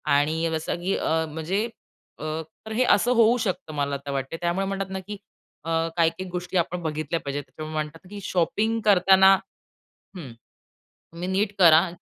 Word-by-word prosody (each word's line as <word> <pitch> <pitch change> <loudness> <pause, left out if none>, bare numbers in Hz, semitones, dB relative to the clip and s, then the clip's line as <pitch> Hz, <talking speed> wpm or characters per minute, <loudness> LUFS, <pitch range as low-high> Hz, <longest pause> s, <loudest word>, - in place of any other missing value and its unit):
आणि 160 +3 +1
जसं 160 0 -2
की 195 - +1
अ, 160 0 0
म्हणजे 165 +7 -2 0.5
अ, - - -8 0.4
तर 220 - -7
हे 250 +3 +2
असं 240 +5 +1
होऊ 235 +1 +5
शकतं 185 -8 -3
मला 140 -1 -1
आता 140 0 -6
वाटतं 135 +2 -3
आहे. - - -10
त्यामुळे 175 +3 0
म्हणतात 195 -1 -3
ना, 190 - -3
की 205 +2 -8 0.5
अ, 165 - -6 0.3
काही-काही 170 +3 +1
गोष्टी 180 +1 -3
आपण 175 +1 -1
बघितल्या 155 +1 -2
पाहिजेत 140 0 -4
त्यामुळे 155 +3 -8
म्हणतात 155 +1 -4
ना 180 - -15
की 205 - -6
शॉपिंग 215 +6 0
करताना 190 -1 +6 0.8
हं. 140 -9 -8 0.8
तुम्ही 175 +2 -5
नीट 195 +2 0
करा. 170 0 +7
175 Hz, 175 wpm, -25 LUFS, 155-195 Hz, 0.8 s, करा